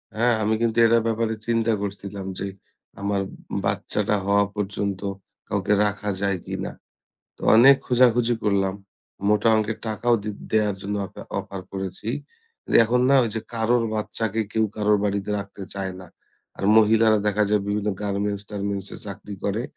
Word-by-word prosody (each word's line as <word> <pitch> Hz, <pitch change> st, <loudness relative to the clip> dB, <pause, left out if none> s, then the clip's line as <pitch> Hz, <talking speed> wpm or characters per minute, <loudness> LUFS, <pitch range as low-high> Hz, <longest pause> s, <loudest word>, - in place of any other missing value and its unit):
হ্যাঁ, 120 Hz, +2 st, +3 dB
আমি 110 Hz, +1 st, +2 dB
কিন্তু 115 Hz, -1 st, +1 dB
এটার 115 Hz, 0 st, +4 dB
ব্যাপারে 115 Hz, 0 st, 0 dB
চিন্তা 115 Hz, -1 st, +2 dB
করছিলাম 100 Hz, -1 st, -5 dB
যে 100 Hz, -, -2 dB, 0.5 s
আমার 100 Hz, -1 st, 0 dB, 0.4 s
বাচ্চাটা 105 Hz, 0 st, 0 dB
হওয়া 100 Hz, 0 st, +3 dB
পর্যন্ত 100 Hz, -1 st, -2 dB, 0.5 s
কাউকে 100 Hz, 0 st, 0 dB
রাখা 105 Hz, 0 st, -2 dB
যায় 100 Hz, -2 st, +1 dB
কিনা। -, -, -4 dB, 0.7 s
তো -, -, -27 dB, 0.2 s
অনেক 135 Hz, +4 st, +8 dB
খোঁজাখুঁজি 120 Hz, -1 st, +4 dB
করলাম। 95 Hz, -2 st, +1 dB, 0.5 s
মোটা 105 Hz, +2 st, +3 dB
অংকের 110 Hz, 0 st, -1 dB
টাকাও 120 Hz, +2 st, +1 dB
দে 105 Hz, -, -3 dB, 0.2 s
দেয়ার 105 Hz, -2 st, +2 dB
জন্য 105 Hz, +1 st, -2 dB
অফা -, -, -11 dB, 0.2 s
অফার 95 Hz, -1 st, -6 dB
করেছি। 95 Hz, +2 st, -5 dB, 0.8 s
এখন 125 Hz, +2 st, +2 dB
না 140 Hz, -, +6 dB, 0.2 s
যে 110 Hz, -, -1 dB
কারোর 115 Hz, +1 st, +2 dB
বাচ্চাকে 110 Hz, 0 st, -2 dB
কেউ 110 Hz, 0 st, +2 dB
কারোর 105 Hz, 0 st, +3 dB
বাড়িতে 100 Hz, 0 st, -1 dB
রাখতে 100 Hz, 0 st, -8 dB
চায় 95 Hz, -1 st, -3 dB
না। 90 Hz, -, -11 dB, 0.5 s
আর 95 Hz, -, -5 dB
মহিলারা 110 Hz, 0 st, +5 dB
দেখা 105 Hz, +1 st, +2 dB
যায় 105 Hz, -2 st, +2 dB
বিভিন্ন 105 Hz, 0 st, -1 dB
গার্মেন্টস 100 Hz, 0 st, -2 dB
টার্মেন্টসে 100 Hz, -1 st, -3 dB
চাকরি 100 Hz, +1 st, -7 dB
করে। 105 Hz, +4 st, 0 dB
105 Hz, 150 wpm, -24 LUFS, 100-110 Hz, 0.8 s, অনেক